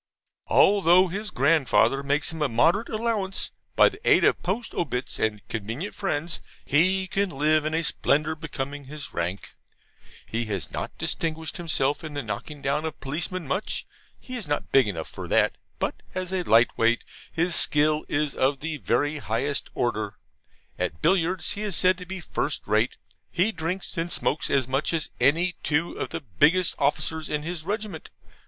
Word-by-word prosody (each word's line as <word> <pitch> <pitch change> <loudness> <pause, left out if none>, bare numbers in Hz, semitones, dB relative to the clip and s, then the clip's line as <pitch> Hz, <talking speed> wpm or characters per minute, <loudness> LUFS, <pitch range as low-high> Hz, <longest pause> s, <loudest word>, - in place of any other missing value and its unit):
Although 185 -2 +5
his 205 +4 -4
grandfather 135 -3 +3
makes 145 +3 0
him 160 - -6
a 150 - +2
moderate 170 - +3
allowance, 215 -4 -1 0.2
by - - +7
the 400 - -4
aid - - +5
of - - +3
POST 210 +6 -2
OBITS 130 -7 -2
and 105 -1 -1
convenient 115 - -4
friends 170 -4 -2 0.2
he 185 +6 +3
can 195 +1 0
live 155 +1 +2
in 155 +1 0
a 165 - +1
splendour 150 0 +1
becoming 145 -3 -5
his 145 +1 -8
rank. 85 +3 -3 0.7
He 115 +1 -2
has 100 -7 -3
not - - -5
distinguished 160 0 -2
himself 155 -5 0
in 155 -2 -6
the 145 - -2
knocking 145 +6 -6
down 140 +2 0
of 160 -2 -5
policemen 160 +5 -3
much; 185 +9 -2 0.3
he 255 - -8
is 230 -9 -4
not 145 - -2
big 135 -4 +5
enough 80 -6 -4
for - - -7
that. - - +3 0.2
But, - - -2
as 185 0 -3
a 185 - +1
light 115 -7 +4
weight, 115 +1 +2 0.3
his 170 +2 +1
skill 150 +1 +3
is 145 -1 0
of 135 +1 +1
the 155 0 -3
very 145 +1 0
highest 140 +4 -1
order. 110 -4 -1 0.6
At 75 - -3
billiards 175 0 +2
he 205 - -5
is 210 -4 -2
said 185 0 +4
to 180 - -9
be 190 +1 -5
first 155 -2 -2
rate. 110 +3 +1 0.3
He 185 +5 +2
drinks 175 +1 -4
and 170 +1 -2
smokes 150 - 0
as 135 -3 +2
much 135 +5 0
as 160 -1 -2
any 165 +8 +3
two 155 +3 0
of - - -2
the - - -4
biggest 150 - +3
officers 160 -1 0
in 150 -1 -1
his 165 -1 -4
regiment. 205 -4 -4
155 Hz, 175 wpm, -26 LUFS, 135-180 Hz, 0.7 s, by